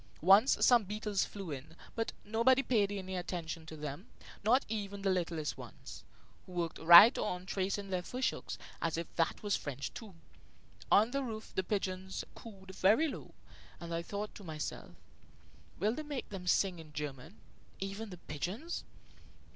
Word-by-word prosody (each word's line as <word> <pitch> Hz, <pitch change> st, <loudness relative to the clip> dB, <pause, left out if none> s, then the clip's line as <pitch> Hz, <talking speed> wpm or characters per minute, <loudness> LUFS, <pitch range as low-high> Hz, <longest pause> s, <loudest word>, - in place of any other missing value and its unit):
Once 200 Hz, +8 st, +7 dB
some 240 Hz, -3 st, +6 dB
beetles 210 Hz, 0 st, -1 dB
flew 195 Hz, -5 st, -7 dB
in; 145 Hz, +3 st, -7 dB, 0.2 s
but 225 Hz, 0 st, -1 dB
nobody 235 Hz, +5 st, +4 dB
paid 215 Hz, -6 st, +2 dB
any 190 Hz, -2 st, -4 dB
attention 170 Hz, -3 st, -4 dB
to 160 Hz, -, -8 dB
them, 150 Hz, -, -6 dB, 0.4 s
not 245 Hz, +6 st, +4 dB
even 200 Hz, -2 st, -4 dB
the 195 Hz, -, +3 dB
littlest 165 Hz, -4 st, -2 dB
ones, -, -, -10 dB, 0.4 s
who 185 Hz, -, -11 dB
worked 170 Hz, -2 st, -2 dB
right 175 Hz, +9 st, +10 dB
on 180 Hz, 0 st, -2 dB
tracing 195 Hz, +1 st, -2 dB
their 180 Hz, -1 st, 0 dB
fish 250 Hz, +8 st, -1 dB
hooks, -, -, -7 dB, 0.2 s
as 165 Hz, -1 st, 0 dB
if 170 Hz, -1 st, -5 dB
that 165 Hz, +4 st, 0 dB
was 205 Hz, -1 st, +1 dB
French, 140 Hz, -1 st, -5 dB
too. 215 Hz, -6 st, -9 dB, 0.8 s
On 220 Hz, +4 st, +6 dB
the 275 Hz, +1 st, 0 dB
roof 220 Hz, -4 st, -6 dB
the -, -, +1 dB
pigeons 190 Hz, -1 st, -3 dB
cooed 195 Hz, -4 st, -11 dB
very 210 Hz, +13 st, +4 dB
low, -, -, -8 dB, 0.4 s
and 170 Hz, -1 st, -6 dB
I 165 Hz, -, -1 dB
thought 205 Hz, +4 st, -5 dB
to 205 Hz, -, -11 dB
myself: 155 Hz, -3 st, -6 dB, 0.8 s
"Will 210 Hz, +5 st, +1 dB
they 310 Hz, -, -4 dB
make 295 Hz, -4 st, -5 dB
them 185 Hz, -3 st, -7 dB
sing 180 Hz, -1 st, +2 dB
in 155 Hz, -2 st, -12 dB
German, 150 Hz, +4 st, -6 dB, 0.4 s
even 200 Hz, +3 st, -4 dB
the 180 Hz, -, -8 dB
pigeons?" 180 Hz, -, -4 dB
190 Hz, 165 wpm, -33 LUFS, 170-215 Hz, 0.8 s, right